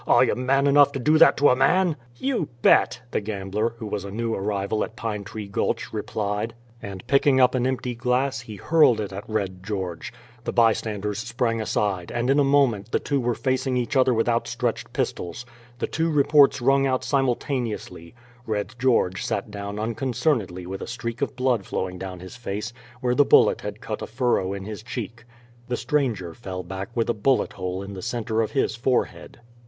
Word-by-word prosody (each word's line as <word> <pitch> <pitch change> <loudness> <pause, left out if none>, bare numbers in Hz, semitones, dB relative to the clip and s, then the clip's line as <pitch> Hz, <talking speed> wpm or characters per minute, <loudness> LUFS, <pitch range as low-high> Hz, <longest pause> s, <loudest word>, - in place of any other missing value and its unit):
"Are - - +6
you - - +2
man 135 +2 +1
enough 140 0 +6
to 135 - -3
do 155 +5 +3
that 165 - +7
to 145 - +5
a 125 - +4
man?" 170 +6 +3 0.2
"You 260 - -1
bet," - - +4
the - - 0
gambler, 105 +2 -2
who 115 - -7
was 105 -2 -3
a 100 - -6
new 115 +3 -2
arrival 100 +1 -1
at 110 - -7
Pine 105 -2 -4
Tree 105 +1 -7
Gulch, 100 - -2
replied; 105 +2 -3 0.3
and 95 -2 -8
picking 140 -1 +4
up 125 -1 +5
an 130 -1 +1
empty 130 -1 -2
glass, 125 +2 0
he 110 -2 -9
hurled 150 - +4
it 100 -2 -4
at 100 +3 -8
Red 95 -4 -2
George. 95 -4 -4 0.3
The - - -2
bystanders 105 -3 +1
sprang 115 -1 -1
aside, 100 -5 -1
and 120 +2 0
in 140 - +4
a - - +5
moment 130 -7 +2
the - - +3
two 140 -1 -1
men 120 - -3
were 120 - +1
facing 130 -1 0
each 125 +4 -2
other 130 -1 +4
with 115 -1 +1
outstretched 120 0 -1
pistols. 90 +7 -3 0.3
The - - -1
two 165 +1 -1
reports 145 -3 +4
rung 135 +2 +3
out 130 -1 0
simultaneously: 120 - -2 0.3
Red 105 +1 -2
George 115 -8 +2
sat 100 +1 -2
down 100 0 -5
unconcernedly 115 - -1
with 95 +2 -6
a - - -5
streak 115 -1 -5
of - - -1
blood 125 -5 +1
flowing 90 -1 -4
down 90 -2 -6
his 95 +5 -10
face, 110 -1 -5 0.3
where 125 -1 +1
the 145 - +5
bullet - - +5
had 105 +2 -6
cut 110 - -5
a - - -4
furrow 115 -5 0
in 100 -1 -5
his 105 0 -6
cheek; 115 0 -6 0.4
the 125 - -1
stranger 120 - -1
fell 95 -5 -6
back 95 +2 -6
with 115 -1 +1
a 120 - +2
bullet 120 +5 +1
hole 95 0 -4
in 100 0 -8
the 95 - -7
center 115 -1 -1
of 110 - -2
his 135 -5 +1
forehead. 125 +1 -1
115 Hz, 200 wpm, -24 LUFS, 100-130 Hz, 0.4 s, that